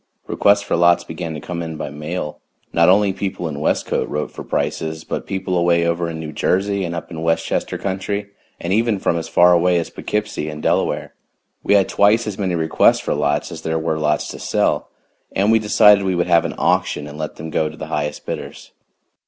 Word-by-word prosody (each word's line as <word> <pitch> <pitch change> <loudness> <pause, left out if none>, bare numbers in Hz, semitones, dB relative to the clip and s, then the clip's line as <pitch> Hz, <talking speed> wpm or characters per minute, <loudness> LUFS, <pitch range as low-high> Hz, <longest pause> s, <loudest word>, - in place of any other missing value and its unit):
Requests 100 0 +3
for - - -1
lots 85 0 +4
began 80 0 -6
to - - -5
come 85 +3 -5
in 80 -1 -5
by - - -5
mail. 75 +1 -5 0.3
Not 85 +1 +5
only 100 +1 +4
people 95 -3 -3
in 75 -2 -5
Westcote - - 0
wrote 75 - -3
for - - -8
prices, 80 0 -2
but - - -5
people 95 -1 -2
away 85 -1 +3
over 85 0 0
in 80 -1 -6
New 80 -1 -6
Jersey 100 +5 0
and 85 -1 -3
up 85 - -7
in 80 -1 -6
Westchester 80 0 -1
Country, 100 +1 -3 0.3
and 85 +2 -2
even 115 0 +2
from 95 - 0
as 85 -1 -3
far 90 0 +5
away 90 +1 +3
as 85 - -2
Poughkeepsie 105 -7 -3
and 75 0 -7
Delaware. - - 0 0.5
We - - +3
had 100 -2 +4
twice 105 +3 +3
as 105 -2 -5
many 95 -3 0
requests 80 -1 +3
for - - -2
lots 75 0 0
as 80 - -7
there 80 0 -1
were 80 -1 -1
lots 75 0 0
to - - -8
sell, - - 0 0.4
and 100 +3 +2
we 115 - +5
decided 105 -1 +5
we 95 -1 0
would 85 0 +1
have 85 -1 +3
an - - -3
auction 75 - +1
and 75 +1 -9
let 75 -1 -4
them 80 +1 -7
go 80 0 0
to 80 - -12
the 80 - -6
highest 75 -1 -3
bidders. - - -7
85 Hz, 215 wpm, -20 LUFS, 80-95 Hz, 0.5 s, Not